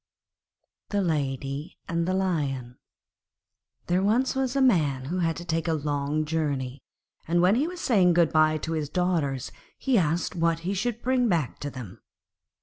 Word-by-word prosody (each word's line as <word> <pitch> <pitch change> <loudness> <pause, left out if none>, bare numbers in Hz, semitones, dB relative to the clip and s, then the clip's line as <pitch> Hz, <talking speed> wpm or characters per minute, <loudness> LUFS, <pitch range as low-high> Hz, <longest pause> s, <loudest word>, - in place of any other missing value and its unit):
The 200 -1 0
Lady 140 -1 -2
and 170 0 -1
the 185 - +1
Lion 140 -10 -2 1.1
There 180 +1 +1
was 235 +7 +2
once 265 -1 -1
a - - +2
Man 150 - +2
who 175 +6 -2
had 165 -2 +1
to 175 - -7
take 165 -1 -1
a 165 - +2
long 145 0 -1
journey, 145 -4 -2 0.5
and 170 +2 +2
when 180 +3 +5
he 270 +7 +2
was 355 -1 -6
saying 185 -7 +4
good 170 -1 +3
bye 155 0 +4
to 160 - -5
his 155 -3 -2
daughters 160 -7 -1 0.3
he 260 -5 +2
asked 170 +2 0
what 165 -1 +1
he 185 +4 -2
should 230 +4 -2
bring 250 -1 +2
back 165 -8 0
to 145 - -4
them. 125 -9 -9
165 Hz, 170 wpm, -26 LUFS, 145-190 Hz, 1.1 s, when